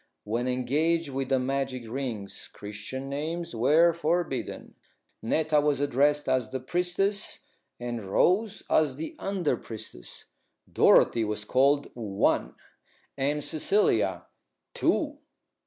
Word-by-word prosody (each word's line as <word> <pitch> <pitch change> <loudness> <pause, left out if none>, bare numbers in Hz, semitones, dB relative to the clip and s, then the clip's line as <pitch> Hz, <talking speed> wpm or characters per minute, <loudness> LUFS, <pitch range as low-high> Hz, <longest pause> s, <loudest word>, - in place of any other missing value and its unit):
When 115 +4 -2
engaged 145 +6 +1
with 135 -1 -3
the 135 - +3
magic 130 -1 -2
rings, 115 -5 -5
Christian 105 +6 -7
names 160 +4 -4
were 155 +9 +4
forbidden. 165 -5 -2 0.5
Netta 150 +5 +2
was 145 -2 +1
addressed 145 +1 +2
as 130 -3 +1
the 130 0 -3
priestess 180 +8 0 0.4
and 120 -2 -4
Rose 200 - +2
as 150 -4 +2
the 160 +3 -6
under 190 -8 0
priestess; 110 - -8 0.5
Dorothy 115 - +5
was 105 0 -3
called 140 +4 +2
One 105 -5 0 0.6
and 145 +2 -1
Cecilia 160 - +1 0.5
Two. - - 0
135 Hz, 110 wpm, -27 LUFS, 120-160 Hz, 0.6 s, Dorothy